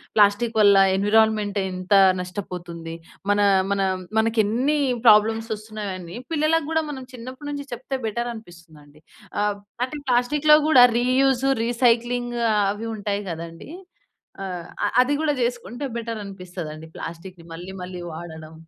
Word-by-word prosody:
Plastic 215 +2 +3
వల్ల 200 -1 +7 0.2
environment 210 0 +2
ఎంత 185 +1 -3 0.3
నష్టపోతుంది. 175 -3 -7 0.4
మన 205 - +2 0.3
మనం 190 -1 0 0.2
మనకెన్నీ 230 +6 +1 0.3
ప్రాబ్లమ్స్ 225 +1 +5
ఒస్తున్నాయి 215 -2 -6
అని 175 +5 -9 0.2
పిల్లలకు 310 0 +1
గూడా 320 0 +1
మనం 265 -3 -6
చిన్నప్పటి 255 +4 -8
నుంచి 285 -1 -6
చెప్తే 265 +3 -4
బెటర్ 235 +2 -2
అనిపిస్తుందండి. 160 -7 -15 0.4
ఆహ్, 205 -1 +1 0.3
ఆటిని 285 +2 -8
ప్లాస్టిక్‌లో 295 +5 +4
గూడా 250 -5 +8
రీయూజ్, 260 +1 +2 0.2
రీసైక్లింగ్ 240 0 +1 0.4
అవి 220 +2 -5
ఉంటాయి 205 0 -2
గదండీ. 165 - -8 0.7
ఆహ్, 180 -2 -5 0.2
ఆ! - - +3 0.2
అది 270 +3 +1
గాడా 305 -2 +1
చేసుకుంటే 245 +2 -3
బెటర్ 230 -1 -4
అనిపిస్తదండి 175 -5 -8
ప్లాస్టిక్‌ని 170 +1 -8
మళ్ళీ 175 +3 -8
మళ్ళీ 180 0 -7
వాడడం. 160 -1 -9
215 Hz, 125 wpm, -23 LUFS, 180-245 Hz, 0.7 s, గూడా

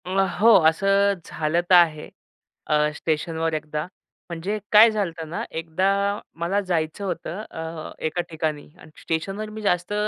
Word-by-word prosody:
अं, 190 +1 +1
हो, 225 +3 +6 0.2
असं 195 +4 +3
झालं 160 +2 -1
तर - - +4
आहे 160 -3 +4 0.6
अ, 150 0 +2
स्टेशनवर 160 +1 -2
एकदा. 150 0 -3 0.5
म्हणजे 175 +5 -3
काय 220 +2 +8
झालं 205 -4 -1
होतं 165 -1 -8
ना, 170 - -4
एकदा 165 +3 -2 0.5
मला 175 +4 0
जायचं 175 0 -2
होतं 180 +1 -4
अ, 160 -1 -6
एका 160 +3 -1
ठिकाणी 155 -2 -3
आणि 155 - -15
स्टेशनवर 195 +6 -3
मी 215 +1 -8
जास्त 180 -1 0
170 Hz, 150 wpm, -23 LUFS, 160-195 Hz, 0.6 s, काय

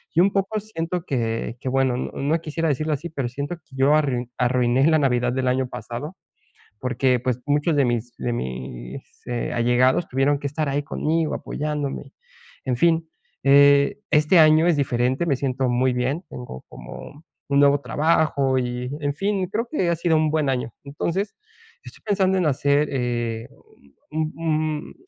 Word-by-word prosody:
y - - +4
un 195 +1 +4
poco 200 +2 0
siento 180 -4 -4
que 115 -2 -2
que 130 - -2
bueno, 130 -1 +1
no 150 +5 -1
quisiera 160 0 -2
decirlo 155 +2 0
así, 165 +4 -4
pero 135 -6 -3
siento 140 +7 -4
que 155 -4 -19
yo 140 +3 +4
arrui 125 -5 0
arruiné 125 +1 +2
la 160 -1 +4
Navidad 125 -3 +1
del 130 -1 -1
año 130 0 0
pasado 145 +10 -6 0.7
porque 125 -1 +1
pues 125 -1 -1
muchos 145 +2 +1
de 140 - +4
mis 120 0 -2
de 120 - -2
mis, 65 - -7
eh, 120 -1 -3
allegados 125 +6 +2
tuvieron 135 +2 +1
que 140 - -4
estar 150 +1 -2
ahí 145 +1 0
conmigo 160 +2 -1
apoyándome. 150 -2 -4 0.5
En 125 -2 0
fin, 165 +2 +2 0.4
eh, 140 +7 +5
este 150 +3 +4
año 155 +1 +6
es 170 -4 +3
diferente, 130 +2 0
me 140 -5 +2
siento 130 -1 -1
muy 125 +1 +2
bien, 135 +8 -1
tengo 125 - -8
como 145 - -11 0.2
un 140 0 +3
nuevo 145 0 +5
trabajo 145 -4 +1
y 125 0 -3
en 145 -1 -1
fin, 195 +2 -1
creo 230 +3 -1
que 185 - 0
ha 170 - +1
sido 165 -1 +2
un 155 -1 +2
buen 155 -3 +1
año. 125 -2 -2
Entonces, 170 +8 -3 0.5
estoy - - -13
pensando 190 -2 +2
en 180 - +1
hacer, 145 +1 +2
eh, 120 -3 -2 0.6
un 155 +1 -2
un 155 -2 -2
140 Hz, 170 wpm, -23 LUFS, 125-160 Hz, 0.7 s, año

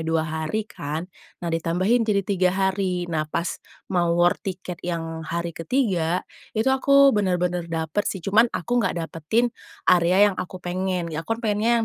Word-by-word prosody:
2 160 0 0
hari 160 +7 -2
kan, 155 -3 -5 0.3
nah 170 -1 -4
ditambahin 185 +8 +1
jadi 200 -2 +2
3 185 -2 +2
hari. 190 -2 0
Nah 155 -3 -2
pas 170 +3 -3 0.3
mau 175 -1 +2
war 175 0 +5
tiket 180 -2 -6
yang 165 -2 -4
hari 170 +1 -3
ketiga 180 - 0 0.3
itu, 255 +5 +3
aku 275 +1 +5
benar-benar 180 -4 0
dapet 160 +4 -1
sih, 185 -4 -5
cuman 220 +4 +4
aku 240 +6 -1
nggak 190 -4 0
dapetin, 170 +9 0 0.3
area 185 +3 +5
yang - - -11
aku 185 +1 -6
pengen, 180 -1 -2
aku 165 +8 -2
pengennya 225 +1 +1
180 Hz, 155 wpm, -24 LUFS, 165-210 Hz, 0.3 s, war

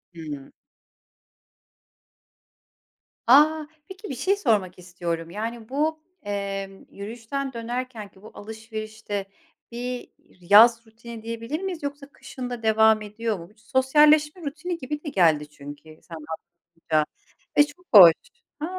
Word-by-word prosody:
Hıı. 150 -4 -8 2.8
A, 300 +4 +6 0.2
peki 380 0 -9
bir 270 - -4
şey 380 +10 +1
sormak 200 - 0
istiyorum. 170 -2 -5
Yani, 225 +4 -6
bu, 310 +3 0 0.2
emm, 195 -1 -5
yürüyüşten 235 +6 -5
dönerkenki 230 -4 -6
bu 220 - -13
alışverişte 215 -1 -6 0.5
bir 245 +1 -5 0.2
yaz 225 +6 +5
rutini 230 0 -11
diyebilir 230 +7 -4
miyiz, 370 -5 -5
yoksa 285 0 -5
kışın 250 -1 -8
da 240 -2 -6
devam 220 0 +4
ediyor 210 -1 -3
mu? 170 +2 -11
Bu, - - -23
sosyalleşme 300 +7 +3
rutini 325 +4 -4
gibi 295 +3 -5
de 295 - -4
geldi 160 - +3
çünkü 150 +2 -12
sen 165 - -11 0.4
anlatınca 165 -2 -2 0.5
ve 290 - +9
çok 340 +5 -17
hoş, 175 -5 +11 0.5
a, 305 - -2
225 Hz, 120 wpm, -24 LUFS, 195-280 Hz, 2.8 s, hoş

